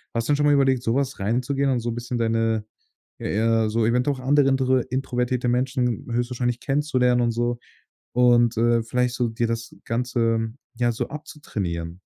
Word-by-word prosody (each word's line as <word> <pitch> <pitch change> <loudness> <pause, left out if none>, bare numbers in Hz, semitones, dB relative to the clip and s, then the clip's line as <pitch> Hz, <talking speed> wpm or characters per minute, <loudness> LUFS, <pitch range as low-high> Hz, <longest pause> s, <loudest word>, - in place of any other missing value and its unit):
Hast 115 0 -1
du - - +4
denn - - +2
schon 145 - +1
mal 145 - +5
überlegt, 135 -3 +3
so 115 0 0
was 140 0 -1
reinzugehen 130 +7 0
und 125 - +1
so 120 +1 -3
'n - - -5
bisschen 120 +1 -4
deine 115 -1 +1 0.5
ja, - - -4
eher 110 +1 +2
so 110 +1 +1
eventuell 125 +5 +1
auch - - -9
andere 140 +1 +3
intr 130 -1 +2
introvertierte 125 -1 -1
Menschen 125 -1 0
höchstwahrscheinlich 120 0 -1
kennenzulernen 130 -4 +1
und 120 -1 +2
so? 120 +1 -1 0.5
Und, 120 -1 +4
äh, 120 0 +3
vielleicht 125 +2 0
so 125 - 0
dir 115 +1 -1
das 115 0 -4
Ganze, 115 -2 0 0.2
ja, 120 0 +1
so - - -3
abzutrainieren? 90 - -5
120 Hz, 185 wpm, -24 LUFS, 115-130 Hz, 0.5 s, mal